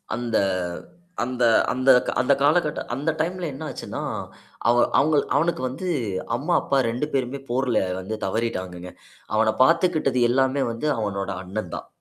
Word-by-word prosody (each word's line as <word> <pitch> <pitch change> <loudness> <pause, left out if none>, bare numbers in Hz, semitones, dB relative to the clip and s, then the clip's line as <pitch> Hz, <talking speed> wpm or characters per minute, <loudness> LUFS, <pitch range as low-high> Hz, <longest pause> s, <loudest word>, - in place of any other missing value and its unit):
அந்த 120 -1 -1 0.9
அந்த 125 0 -2 0.3
அந்த 130 +1 +1 0.3
அந்த 140 - +4
காலகட்ட 150 +2 +2
அந்த 140 +6 -1
டைம்ல 175 +3 -1
என்ன 140 - -7
ஆச்சுன்னா, - - -6 0.7
அவ 120 - +5 0.2
அவங்க 155 +2 +3 0.2
அவனுக்கு 165 -3 +1
வந்து 135 +9 -5 0.5
அம்மா, 150 +8 -1
அப்பா 140 - 0
2 120 +5 -1
பேருமே 135 0 -1
போர்ல 125 0 +1 0.2
வந்து 95 +4 -4
தவறிட்டாங்கங்க. 95 -4 -3 0.4
அவன 110 0 +3
பார்த்துக்கிட்டது 160 -4 +2
எல்லாமே 130 +2 +2
வந்து 115 +7 -3
அவனோட 100 -2 -2
அண்ணன் 95 -1 -5
தான். - - -7
130 Hz, 135 wpm, -24 LUFS, 110-150 Hz, 0.9 s, அவ